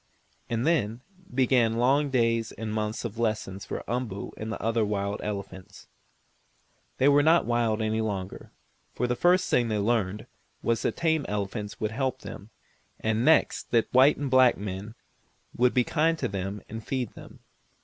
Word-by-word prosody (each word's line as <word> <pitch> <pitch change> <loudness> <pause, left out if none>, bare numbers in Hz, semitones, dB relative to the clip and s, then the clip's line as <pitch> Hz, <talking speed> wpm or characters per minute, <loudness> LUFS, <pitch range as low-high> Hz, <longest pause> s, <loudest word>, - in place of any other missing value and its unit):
And 115 +2 -1
then 125 -8 +1 0.3
began 125 -3 +3
long 140 +4 +3
days 115 -3 +1
and 110 0 -5
months 110 +1 -2
of 115 0 -5
lessons 110 -4 -2
for - - -5
Umboo 115 -4 -3
and 110 +1 -5
the - - -4
other 115 0 +1
wild 100 -1 -2
elephants. 100 -3 -7 1.1
They 130 - +3
were 145 0 +6
not 160 +3 +4
wild 115 -2 +1
any 110 +1 0
longer, 100 -4 -5 0.4
for 125 - 0
the 125 0 0
first 180 +6 +3
thing 120 -1 +2
they 110 -1 -1
learned 105 -2 0 0.4
was 115 -1 +1
that - - -1
the - - -13
tame 160 -2 +2
elephants 105 0 -4
would 110 0 -1
help 130 +2 -2
them, 100 - -9 0.5
and 110 +1 0
next 160 +2 +3
that 115 -2 +1
the - - -9
white 140 +3 +6
and 140 -2 -3
black 130 -1 +5
men 100 +2 -6 0.6
would 125 +1 +2
be 125 - +4
kind 165 +4 +1
to - - -1
them 100 +1 -4
and 110 +1 -7
feed 130 -3 -3
them. - - -13
115 Hz, 175 wpm, -27 LUFS, 105-130 Hz, 1.1 s, were